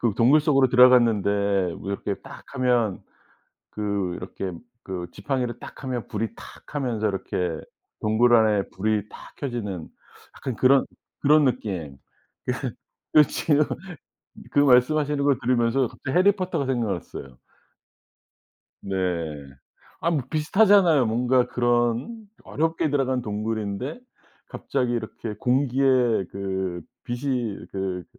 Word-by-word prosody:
그 115 -4 +1
동굴 130 +7 +5
속으로 135 -4 +3
들어갔는데 100 -7 +4
뭐 100 - -6
이렇게 100 0 -2
딱 140 +1 -11
하면 120 -6 +1 0.7
그 100 -4 -2
이렇게 95 +1 -6 0.3
그 90 -2 -5
지팡이를 120 +2 -3
딱 - - -11
하면 125 -5 -3
불이 115 0 -3
탁 - - -13
하면서 120 -7 -1
이렇게 90 -4 -3 0.4
동굴 115 +3 +3
안에 105 -3 +2
불이 105 +1 -1
탁 - - -13
켜지는 105 - -4 0.5
약간 130 -3 -5
그런 130 +3 +4 0.4
그런 150 +1 +5
느낌. 95 - -2 0.5
그 - - -3 0.4
그 150 - +10
지금 150 -1 +2 0.9
그 - - -1
말씀하시는 145 +2 +4 0.3
들으면서 125 +1 +2
갑자기 130 +7 -2
해리 200 +3 +6
포터가 185 -7 -2
생각났어요. 100 - -4 1.4
네. 100 - -5 1.1
아 170 - +1
뭐 155 -5 0
비슷하잖아요. 170 - +4
뭔가 125 +3 +2
그런 120 - 0 0.2
어렵게 160 0 -1
들어간 130 -3 0
동굴인데 110 - -3 0.5
갑자기 125 -3 -2
이렇게 110 -1 -4
공기에 130 +1 +1 0.5
그 95 -2 -3 0.2
빛이 120 -4 -3
그 95 -2 -3
120 Hz, 255 characters per minute, -24 LUFS, 100-135 Hz, 1.4 s, 그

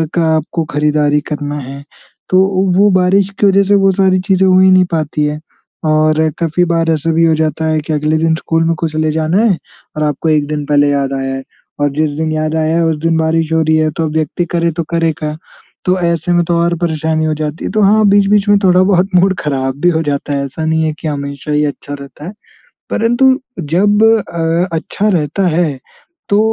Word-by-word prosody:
का 170 - +2
आपको 160 +2 -2
खरीदारी 150 0 +1
करना 145 -1 -4
है। 140 +1 -9 0.5
तो 185 - +3 0.2
ओ - - +2
वो 205 +1 +5
बारिश 185 +1 +2
की - - +3
वजह 195 0 +4
से 200 +1 +2
वो 195 -1 +3
सारी 190 -1 +2
चीज़ें 190 -1 +3
हो 185 0 +4
ही 190 0 +5
नहीं 185 0 +5
पाती 155 -2 -1
हैं 150 0 -3 0.5
और 155 +1 +2
काफ़ी 170 +1 0
बार 165 -1 0
ऐसा 160 +1 -1
भी 165 +1 +2
हो 165 - +3
जाता 155 0 -1
है 155 0 +1
कि 155 - -1
अगले 150 +1 0
दिन 160 0 +1
स्कूल 165 0 -1
में 165 0 +1
कुछ 160 -2 -3
ले 155 0 0
जाना 160 +5 0
है 205 -6 +2 0.4
और 155 - -1
आपको 150 +2 -1
एक 150 -2 +1
दिन 150 -1 -3
पहले 145 0 +2
याद 140 -1 -1
आया 135 0 -3
है 135 - -5 0.4
और 145 - +2
जिस 155 0 +1
दिन 160 0 -2
याद 155 0 -2
आया 160 0 0
है, 170 - +2
उस 160 -1 0
दिन 165 0 +1
बारिश 160 0 0
हो 160 - +2
रही 160 0 +2
है, 155 0 +1
तो 160 +2 -2
अब 155 - -3
व्यक्ति 160 +2 -1
करे 170 0 +1
तो 165 +1 -3
करे 165 -1 +1
क्या? 150 -1 -4 0.5
तो 185 +1 +2
ऐसे 170 0 0
में 175 0 +2
तो 170 0 0
और 170 0 +1
परेशानी 160 -1 -1
हो 155 - 0
जाती 150 +1 -5
है। - - -3
तो 215 - 0
हाँ, 215 +2 +4
बीच-बीच 200 +1 +3
में 205 - +5
थोड़ा 185 -1 +4
बहुत 190 0 +2
मूड 190 +1 +3
खराब 135 -2 -3
भी 175 - +4
हो 160 -2 0
जाता 145 -1 -3
है, 140 0 -1
ऐसा 150 +4 -5
नहीं 160 0 +1
है 155 -1 -1
कि 160 - -5
हमेशा 140 0 -5
ही 150 0 +1
अच्छा 145 0 -6
रहता 140 +1 -10
है। - - -6 0.6
परंतु 260 +3 +2 0.2
जब 195 +7 +1
अ, 175 -6 +1
अच्छा 200 +6 -2
रहता 175 0 0
है, 160 -6 0 0.5
तो 200 - +2
160 Hz, 230 wpm, -14 LUFS, 150-180 Hz, 0.6 s, वो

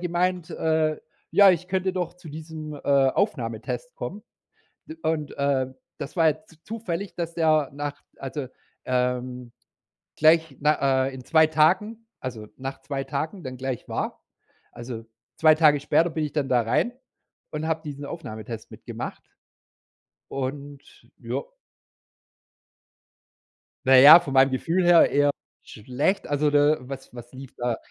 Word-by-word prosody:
gemeint, 175 0 -1
äh, 160 -1 +1 0.3
ja, 200 -1 +7
ich 180 0 -1
könnte 190 0 0
doch 180 -2 -3
zu 180 -2 -13
diesem, 155 0 -8
äh, - - -9
Aufnahmetest 135 - 0
kommen. 210 - -6 0.8
Und, 155 -2 -2
äh, 140 -2 +1 0.3
das 140 - -7
war 165 -3 +4
jetzt 155 +1 -3
zufällig, 200 -4 -5
dass 170 -1 -4
der 155 -4 +2
nach 145 0 -5 0.2
also, 135 0 -5 0.4
ähm, 125 -1 -2 0.6
gleich 160 -1 +4
na 140 -3 +2
äh, 135 - -5
in 130 -1 -9
2 160 -1 +5
Tagen 190 +9 +2
also 115 -5 -6
nach 135 +1 -6
2 135 0 -4
Tagen 155 +7 -4
dann 130 -2 -6
gleich 130 -1 -4
war. - - -3 0.5
Also 120 -2 -8 0.3
2 155 -1 +5
Tage 150 -2 +5
später 165 +4 +2
bin 160 -1 -3
ich 150 - -3
dann 145 -3 -1
da 125 -2 +3
rein 115 - 0 0.6
und 155 +1 -3
habe 160 0 -1
diesen 145 -1 -7
Aufnahmetest 110 -8 -8
mitgemacht. - - -7 1.1
Und 140 +1 -5 0.4
ja - - -3 2.5
Na 130 0 +7
ja, 150 +6 +11
von 145 -6 -6
meinem 135 0 +6
Gefühl 165 +8 0
her 175 -1 +6
eher 145 0 +3 0.3
schlecht. 130 - -2
Also, 145 +1 +1
da 145 +1 +4
was 135 0 -9
was 120 0 -11
lief 130 0 -11
da? 120 -1 -1
145 Hz, 140 wpm, -25 LUFS, 130-165 Hz, 2.5 s, ja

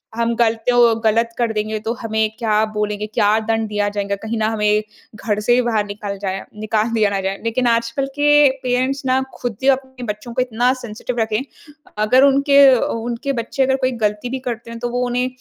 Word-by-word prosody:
हम 235 0 0
गलतो 230 +1 +3
गलत 230 +2 +2
कर 235 -2 0
देंगे 215 0 -2
तो 230 - +1
हमें 220 -1 0
क्या 215 -2 +2
बोलेंगे? 210 0 -2
क्या 210 0 +2
दंड 225 0 -1
दिया 205 -1 0
जाएगा? 200 0 -1
कहीं 220 +3 -5
ना 215 - +1
हमें 210 -1 +1 0.3
घर 210 0 -2
से 240 - +5
ही 250 - +3
बाहर 215 -3 +1
निकल 205 0 -6
जाएँ 195 -1 -3 0.2
निकाल 215 +1 0
दिया 215 -2 +3
ना 195 -1 -2
जाए। 190 +1 -2
लेकिन 235 +2 0
आजकल 235 +3 0
के 295 - +3 0.4
पेरेंट्स 255 +3 0
ना 260 0 +2
खुद 240 -4 -4
ही - - +1
अपने 260 -2 -13
बच्चों 230 +3 -11
को 255 - 0
इतना 250 +1 +1
सेंसिटिव 235 +2 -5
रखे 220 -1 0
हैं। 255 +5 -1 0.5
अगर 215 +5 +4
उनके 280 +1 +3
अ, 255 -2 +4
उ 230 +1 -2
उनके 275 +4 -3
बच्चे 240 +2 -1
अगर 265 0 +2
कोई 260 -1 0
गलती 210 +3 -1
भी 265 +1 -3
करते 235 -1 -5
हैं 230 - -7
तो 240 +1 -3
वो 245 +1 -2
उन्हें 250 +1 0
230 Hz, 215 wpm, -19 LUFS, 210-245 Hz, 0.5 s, से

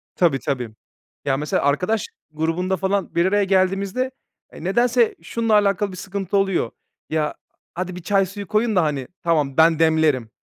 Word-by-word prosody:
Tabii, 160 -7 +2
tabii. 125 -5 -3 0.6
Ya, 135 -1 +1
mesela 150 +1 -1
arkadaş 180 +10 +1 0.2
grubunda 165 +4 -1
falan 195 +2 -1
bir 170 - +3
araya 205 +2 +3
geldiğimizde, 195 +6 +1 0.4
eee, - - -10
nedense 235 +5 +2
şununla 230 -2 -1
alakalı 205 -1 +3
bir 185 - -9
sıkıntı 195 +1 -2
oluyor: 195 -11 +1 0.4
"Ya 155 -1 -1 0.4
hadi 185 +1 -4
bir 180 - -7
çay 195 +2 +2
suyu 200 +1 -8
koyun 215 +4 +1
da, 180 - +4
hani, 145 -4 -2 0.2
tamam 150 -5 +1
ben 160 0 +5
demlerim." 160 -7 +2
185 Hz, 160 wpm, -22 LUFS, 160-200 Hz, 0.6 s, ben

